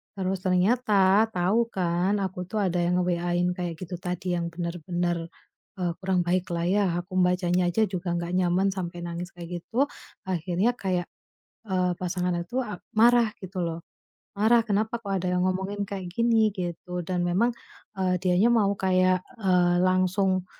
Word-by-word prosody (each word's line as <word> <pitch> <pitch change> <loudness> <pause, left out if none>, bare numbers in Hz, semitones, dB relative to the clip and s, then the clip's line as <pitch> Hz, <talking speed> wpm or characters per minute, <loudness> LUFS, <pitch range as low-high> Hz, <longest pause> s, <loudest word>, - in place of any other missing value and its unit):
terus 190 -1 -2
ternyata 200 +1 +4
tau 190 +6 +2
kan 185 +2 0
aku 185 -1 -4
tuh 215 +3 -2
ada 180 -2 0
yang 175 +1 +2
nge-WA-in 175 0 0
kayak 175 -2 -3
gitu 180 -1 -5
tadi, 180 0 -3
yang 170 - -2
bener-bener, 175 0 -2 0.5
eee, 180 -1 0
kurang 185 -2 +1
baiklah 175 -1 0
ya, 200 +1 +3 0.2
aku 185 +1 -6
membacanya 180 0 +2
aja 200 +6 0
juga 180 -2 -3
gak 170 0 -3
nyaman 185 +1 +2
sampai 175 -2 -5
nangis 170 +1 -5
kayak 175 0 -6
gitu. 265 +10 0 0.4
Akhirnya 185 +5 0
kayak, 180 -2 -1 0.6
eee, 185 -2 +1
pasangan 180 0 -1
atu 210 +10 -2
a 210 -6 -6 0.2
marah 235 0 +5
gitu 190 -1 -8
loh, 165 0 -3 0.6
marah, 230 +3 +5
"Kenapa 220 +3 0
kok 205 - -7
ada 180 - -2
yang 180 - +1
ngomongin 190 +2 -2
kayak 190 -3 -5
gini?" 225 -1 +3
Gitu, 180 0 -4
dan 180 +1 -2
memang, 205 +8 +2 0.5
eee, 185 -1 +2
dianya 185 +5 +4
mau 210 -4 +3
kayak, 185 -1 +3 0.2
eee, 180 -3 +3
langsung 185 0 +2
185 Hz, 155 wpm, -26 LUFS, 175-195 Hz, 0.6 s, marah